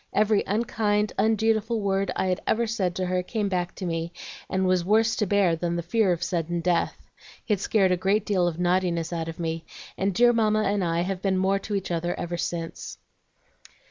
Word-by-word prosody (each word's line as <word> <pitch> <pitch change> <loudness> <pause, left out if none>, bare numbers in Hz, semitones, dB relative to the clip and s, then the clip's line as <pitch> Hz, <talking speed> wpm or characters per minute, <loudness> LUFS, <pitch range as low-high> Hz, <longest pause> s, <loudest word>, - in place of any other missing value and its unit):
Every 210 0 +3
unkind, 210 -1 0
undutiful 220 +1 +2
word 195 -1 0
I'd 185 -1 0
ever 235 +1 +2
said 195 -6 -1
to 185 - -1
her 180 0 0
came 205 +2 -2
back 180 -1 -2
to 190 - -5
me, 165 0 -2 0.4
and 190 0 0
was 185 -1 +2
worse 220 +4 +3
to 210 - 0
bear 195 -4 +3
than 170 +1 -2
the 170 - -2
fear 210 +2 +2
of 170 -1 -1
sudden 170 -1 -1
death. 175 0 -1 0.4
It 210 -5 +1
scared 195 -1 +2
a 180 - +2
great 195 +3 +1
deal 185 -4 +2
of 165 -2 -2
naughtiness 175 -2 0
out 165 -1 -3
of 165 +1 -7
me, 165 -1 -3 0.4
and 195 +1 +1
dear 240 +5 +4
Mamma 215 -2 +2
and 200 -1 0
I 170 0 0
have 185 +1 -3
been 190 -1 +1
more 190 +1 +2
to 205 +1 -4
each 190 -2 -3
other 175 +1 -2
ever 175 0 -3
since." 170 -1 -4
190 Hz, 205 wpm, -25 LUFS, 175-210 Hz, 0.4 s, dear